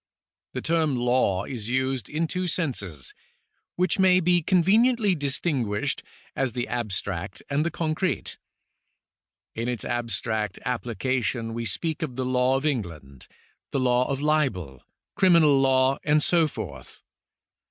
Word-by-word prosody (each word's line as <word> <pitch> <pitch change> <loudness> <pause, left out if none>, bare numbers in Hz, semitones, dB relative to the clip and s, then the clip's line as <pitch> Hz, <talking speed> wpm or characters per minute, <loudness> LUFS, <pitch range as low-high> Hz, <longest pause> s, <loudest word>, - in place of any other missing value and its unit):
The - - -4
term 160 -4 +1
law 120 -6 +1
is 120 -4 -5
used 130 -3 -1
in 160 +2 -1
two 180 +3 -2
senses, 105 - -3 0.6
which 180 +1 +1
may 185 -1 +5
be 175 0 +3
conveniently 205 +5 +3
distinguished 140 -7 -1 0.3
as 130 -4 -1
the 120 0 -2
abstract 100 -5 -4
and 145 +2 +2
the 170 - 0
concrete. 165 +3 -2 1.1
In 115 +1 -3
its 120 -4 -2
abstract 115 -3 -2
application 120 -1 -2
we 115 0 -3
speak 155 - -2
of 145 -6 -3
the 130 0 -2
law 130 +1 +2
of 135 +2 -1
England, 85 - -4 0.4
the - - -1
law 125 0 +2
of 140 0 -2
libel, 120 - 0 0.3
criminal 165 -7 +5
law, 130 0 +3
and 150 0 +3
so 170 -3 +3
forth. - - -8
130 Hz, 130 wpm, -25 LUFS, 115-160 Hz, 1.1 s, may